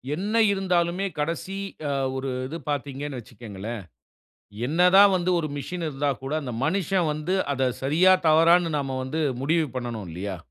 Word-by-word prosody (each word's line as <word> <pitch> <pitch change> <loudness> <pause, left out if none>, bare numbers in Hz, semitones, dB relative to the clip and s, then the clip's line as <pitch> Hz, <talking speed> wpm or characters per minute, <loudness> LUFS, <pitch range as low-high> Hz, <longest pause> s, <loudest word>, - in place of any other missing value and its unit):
என்ன 200 +5 -3 0.2
இருந்தாலுமே 185 -1 0
கடசி 170 +5 -3 0.3
அ - - 0 0.2
ஒரு 135 0 -3 0.2
இது 160 +5 -5
பார்த்தீங்கனு 140 -1 -3
வச்சுகீங்களேன். 110 -1 -8 0.8
என்ன 160 +6 -1
தா 195 - +10
வந்து 180 0 0
ஒரு 155 -2 -2
மிசின் 170 +4 -4
இருந்தா 145 0 -1
கூட 135 +2 -5
அந்த 125 - -5
மனிசன் 185 0 +1
வந்து 155 +5 -2 0.2
அத 135 -1 -2 0.2
சரியா 170 +7 +5 0.2
தவறானு 165 +2 +5
நாம 135 -2 -3
வந்து 155 +5 -2 0.2
முடிவு 160 +2 +2
பண்ணனு 120 -3 -4
இல்லையா? 95 +3 -5
155 Hz, 150 wpm, -25 LUFS, 130-175 Hz, 0.8 s, தா